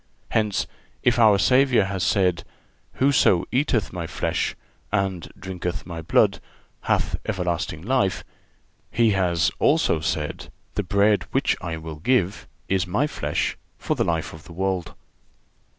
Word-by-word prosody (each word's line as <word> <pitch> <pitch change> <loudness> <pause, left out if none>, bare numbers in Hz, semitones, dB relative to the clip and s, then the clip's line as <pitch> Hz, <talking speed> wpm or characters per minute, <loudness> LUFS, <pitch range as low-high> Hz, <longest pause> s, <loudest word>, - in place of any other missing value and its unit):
Hence, 105 -3 +1 0.4
if 120 0 +3
our 110 -3 +6
Savior 125 0 +4
has 95 -1 -3
said: 90 -4 +2 0.5
"Whoso 130 -10 +3
eateth 125 -4 +1
My 85 -2 -4
flesh, - - -1 0.4
and 95 -4 -1
drinketh 90 -2 -5
My 85 -2 -6
blood, 80 - +3 0.5
hath - - +1
everlasting 90 -6 -2
life," 105 -4 +1 0.7
He 115 -2 +3
has 90 -4 +2
also 80 - +3
said: 75 -1 -3 0.2
"The 105 - 0
bread 100 +2 +2
which - - +1
I 80 -1 -4
will 80 -1 -7
give 100 +1 0 0.2
is 95 -1 +1
My 105 +11 +1
flesh, 150 - -2 0.2
for - - -1
the - - +1
life 80 -2 -1
of 80 -1 -12
the 85 - -11
world." 95 0 -2
95 Hz, 135 wpm, -24 LUFS, 85-110 Hz, 0.7 s, our